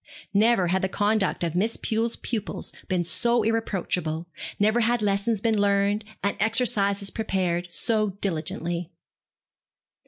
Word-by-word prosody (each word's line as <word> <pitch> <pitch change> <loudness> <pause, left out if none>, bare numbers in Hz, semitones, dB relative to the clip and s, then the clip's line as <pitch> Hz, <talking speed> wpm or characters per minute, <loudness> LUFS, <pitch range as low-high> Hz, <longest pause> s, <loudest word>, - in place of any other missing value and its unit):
Never 205 -3 +4
had 190 +1 +2
the 190 - 0
conduct 205 -2 +1
of 165 -2 -1
Miss 210 +6 0
Pew's 225 +1 -1
pupils 220 -4 -4
been 180 -2 +1
so 235 +8 +1
irreproachable, 180 -7 -1 0.3
never 215 +3 +3
had 240 +1 +2
lessons 200 +1 +1
been 225 -1 +2
learned, 200 +1 +2 0.2
and 200 - +1
exercises 205 -3 +2
prepared, 180 -5 -1
so 215 +4 0
diligently. 175 -2 -3
200 Hz, 125 wpm, -25 LUFS, 180-220 Hz, 0.3 s, Never